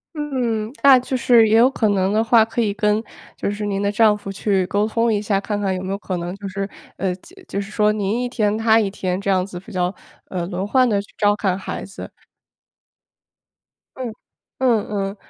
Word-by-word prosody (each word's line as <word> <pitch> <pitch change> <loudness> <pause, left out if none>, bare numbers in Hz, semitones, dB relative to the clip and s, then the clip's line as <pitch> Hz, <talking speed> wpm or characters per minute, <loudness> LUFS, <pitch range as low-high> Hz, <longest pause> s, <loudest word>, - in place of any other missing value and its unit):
嗯， 245 -7 -2
那 275 -2 +8
就 255 +1 -3
是 235 -2 +5
也 215 - +4
有 240 +3 +6
可 225 -5 0
能 190 -1 +1
的 215 +1 +3
话， 225 0 +5
可 225 +2 -3
以 210 -3 0
跟， 210 +1 +1 0.3
就 - - -2
是 205 +1 -4
您 200 -1 -1
的 200 0 +1
丈 215 0 +4
夫 205 -1 -8
去 195 -1 0
沟 205 +3 +1
通 230 +1 +1
一 205 -1 0
下， 200 -2 0
看 205 +1 -3
看 195 -2 0
有 185 - -4
没 190 - -5
有 195 - -1
可 190 -3 -4
能 175 +2 -5
就 200 0 -8
是， 195 +1 -3 0.3
呃， 190 -2 -1
就 270 - -18
就 200 - -2
是 200 - -9
说 210 0 +2
您 210 +2 -1
一 250 - -1
天 215 -4 0
他 225 0 +4
一 210 -3 +1
天 185 -2 -2
这 200 0 -2
样 185 -1 +2
子 180 -3 -8
比 195 - -13
较 180 0 -1 0.3
呃， 175 -2 -3
轮 185 +1 -3
换 255 +2 +4
地 205 -3 +1
去 200 - -11
照 205 0 +3
看 195 -3 -1
孩 195 - -5
子。 195 +2 -9 1.9
嗯， 250 -3 -4 0.5
嗯 240 -5 +2
嗯。 195 -1 -2
205 Hz, 240 characters per minute, -21 LUFS, 195-225 Hz, 1.9 s, 那